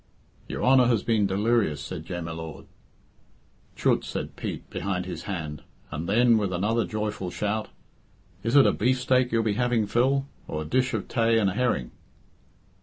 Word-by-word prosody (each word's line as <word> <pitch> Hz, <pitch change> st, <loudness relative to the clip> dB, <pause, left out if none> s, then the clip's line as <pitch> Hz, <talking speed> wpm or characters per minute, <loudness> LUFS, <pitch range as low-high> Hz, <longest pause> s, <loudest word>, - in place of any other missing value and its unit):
"Your -, -, -4 dB
Honour 130 Hz, -1 st, +6 dB
has 115 Hz, -4 st, +2 dB
been 110 Hz, -3 st, +2 dB
delirious," 100 Hz, -5 st, +1 dB
said 80 Hz, +2 st, -7 dB
Jem 90 Hz, -2 st, -4 dB
y 85 Hz, -, -5 dB
Lord. 80 Hz, -2 st, -7 dB, 1.1 s
"Chut!" -, -, +2 dB
said -, -, -5 dB
Pete -, -, -5 dB
behind 90 Hz, -2 st, -2 dB
his 90 Hz, -3 st, -6 dB
hand, 80 Hz, -6 st, -4 dB, 0.3 s
and 75 Hz, +3 st, -4 dB
then, 115 Hz, +2 st, +5 dB
with 100 Hz, -3 st, -1 dB
another 105 Hz, +6 st, +1 dB
joyful 105 Hz, -3 st, -3 dB
shout, 105 Hz, +3 st, -2 dB, 0.7 s
"Is 115 Hz, +5 st, -1 dB
it 140 Hz, -, +8 dB
a -, -, +5 dB
beefsteak 125 Hz, +1 st, +2 dB
you'll 115 Hz, 0 st, +2 dB
be 110 Hz, -2 st, +1 dB
having, 120 Hz, -1 st, +1 dB
Phil, 130 Hz, +6 st, +2 dB, 0.2 s
or 75 Hz, 0 st, -3 dB
a -, -, -9 dB
dish 130 Hz, +8 st, +1 dB
of 105 Hz, -, -3 dB
tay 115 Hz, -1 st, +2 dB
and 100 Hz, -3 st, +2 dB
a -, -, -5 dB
herring?" 115 Hz, -, 0 dB
105 Hz, 175 wpm, -26 LUFS, 90-120 Hz, 1.1 s, it